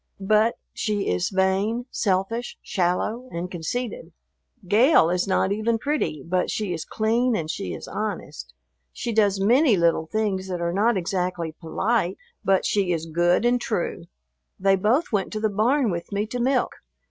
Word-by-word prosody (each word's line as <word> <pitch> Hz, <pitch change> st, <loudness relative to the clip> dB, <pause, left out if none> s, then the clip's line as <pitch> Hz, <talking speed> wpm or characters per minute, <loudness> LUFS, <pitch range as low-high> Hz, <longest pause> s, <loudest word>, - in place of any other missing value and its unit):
But 215 Hz, +3 st, +3 dB, 0.2 s
she 210 Hz, -2 st, -1 dB
is 90 Hz, 0 st, 0 dB
vain, 195 Hz, +5 st, +1 dB
selfish, 200 Hz, +5 st, -1 dB
shallow, 210 Hz, +7 st, -1 dB
and 175 Hz, +2 st, -4 dB
conceited. 245 Hz, -, -4 dB, 0.5 s
Gale 215 Hz, -, +5 dB
is 180 Hz, +2 st, 0 dB
not 190 Hz, 0 st, +1 dB
even 220 Hz, +3 st, +1 dB
pretty, 250 Hz, -, -2 dB
but 180 Hz, +2 st, 0 dB
she 205 Hz, -4 st, -2 dB
is 160 Hz, -, -5 dB
clean 230 Hz, +3 st, +1 dB
and 160 Hz, -5 st, -2 dB
she 195 Hz, -, -4 dB
is -, -, -9 dB
honest. 215 Hz, 0 st, -5 dB, 0.4 s
She 235 Hz, -2 st, -4 dB
does 205 Hz, -3 st, +3 dB
many 235 Hz, +3 st, +4 dB
little 165 Hz, -2 st, +2 dB
things 200 Hz, -2 st, -1 dB
that 180 Hz, -2 st, -3 dB
are 170 Hz, 0 st, -1 dB
not 210 Hz, +3 st, +2 dB
exactly 180 Hz, -2 st, -2 dB
polite, 185 Hz, +4 st, -1 dB, 0.3 s
but 195 Hz, -1 st, +2 dB
she 195 Hz, -3 st, +1 dB
is 165 Hz, -2 st, -1 dB
good 175 Hz, +6 st, +2 dB
and 245 Hz, 0 st, +2 dB
true. 175 Hz, -5 st, -2 dB, 0.5 s
They 195 Hz, 0 st, +4 dB
both 220 Hz, -, +1 dB
went 200 Hz, -4 st, 0 dB
to 215 Hz, -, -2 dB
the 215 Hz, 0 st, +1 dB
barn 230 Hz, +4 st, +2 dB
with 170 Hz, +2 st, -5 dB
me 200 Hz, +1 st, 0 dB
to 245 Hz, +3 st, -5 dB
milk. 255 Hz, +1 st, +1 dB
200 Hz, 165 wpm, -24 LUFS, 180-230 Hz, 0.5 s, Gale